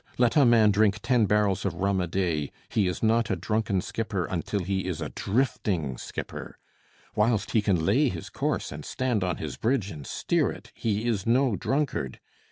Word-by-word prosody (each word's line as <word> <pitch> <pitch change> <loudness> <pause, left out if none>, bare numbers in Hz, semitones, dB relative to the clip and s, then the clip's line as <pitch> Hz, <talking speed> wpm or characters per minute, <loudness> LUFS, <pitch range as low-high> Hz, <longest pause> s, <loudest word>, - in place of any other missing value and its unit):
Let 120 -2 +3
a 145 -3 +6
man 115 -3 +6
drink 105 0 +3
ten 120 -5 +3
barrels 100 -2 +2
of 95 -4 -1
rum 95 +1 +1
a 90 - -1
day, 85 -5 -1 0.2
he 105 -4 +1
is 90 - -3
not 115 +1 +3
a - - +1
drunken 105 +1 0
skipper 105 -3 -2
until 95 +3 -2
he 95 +1 -2
is 90 -4 -3
a 75 -2 -3
drifting 95 - -1
skipper. - - -7 0.6
Whilst 105 -1 +1
he 110 - +3
can 95 -6 +1
lay 130 - +3
his 85 -7 -6
course - - -2
and 75 +1 -7
stand 125 - -1
on 90 -3 -1
his - - -5
bridge 115 -4 0
and 75 -4 -8
steer - - +1
it, - - -11
he 110 +1 -1
is 105 -4 -1
no 125 -1 +3
drunkard. 130 - -1
100 Hz, 190 wpm, -27 LUFS, 90-115 Hz, 0.6 s, a